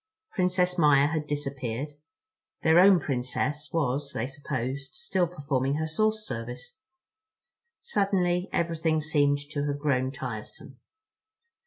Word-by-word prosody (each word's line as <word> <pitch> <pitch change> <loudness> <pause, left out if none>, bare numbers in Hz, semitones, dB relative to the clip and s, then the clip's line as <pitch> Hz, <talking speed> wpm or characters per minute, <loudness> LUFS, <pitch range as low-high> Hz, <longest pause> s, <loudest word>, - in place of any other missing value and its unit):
Princess 180 -1 +1
Maia 145 -2 +5
had 155 -1 -2
disappeared. 140 -2 -3 0.7
Their 160 +2 +6
own 190 0 +7
Princess 145 +2 -2
was, 140 -3 -1
they 115 - -1
supposed, 135 - -4
still 195 - 0
performing 140 -5 -1
her 160 +1 -1
source 215 +6 0
service. 125 0 -6 1.1
Suddenly 190 - +1
everything 165 -2 +1
seemed 145 -2 +2
to 145 -1 -1
have 145 0 -1
grown 130 -3 +1
tiresome. 125 -6 -7
150 Hz, 115 wpm, -28 LUFS, 135-170 Hz, 1.1 s, own